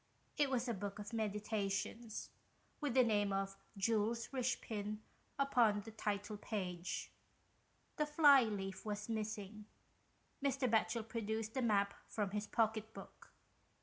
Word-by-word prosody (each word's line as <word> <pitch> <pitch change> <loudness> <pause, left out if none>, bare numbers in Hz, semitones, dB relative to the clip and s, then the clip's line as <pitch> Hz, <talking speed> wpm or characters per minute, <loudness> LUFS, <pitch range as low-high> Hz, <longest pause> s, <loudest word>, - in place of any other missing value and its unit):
It 290 -3 +3
was 255 -1 0
a 235 - +1
Book 200 0 -4
of 210 +2 -7
Meditations, 215 +1 -2 0.5
with 290 -5 -1
the 255 - +7
name 205 -3 +2
of 195 0 -1 0.2
Jules 225 +3 +1
Richepin 220 -5 -1 0.4
upon 240 -7 +4
the 225 - -9
title 210 -1 -2
page. 185 -4 -3 0.9
The 300 - +1
fly 295 -3 +8
leaf 195 -3 -3
was 210 0 -3
missing. 215 -1 -4 0.8
Mr. 275 -2 +2
Batchel 225 0 +2
produced 220 -1 -2
the 260 - 0
map 200 -4 +3
from 205 -3 -1
his 210 +1 -2
pocket 220 -1 0
book. - - -11
215 Hz, 130 wpm, -38 LUFS, 205-235 Hz, 0.9 s, fly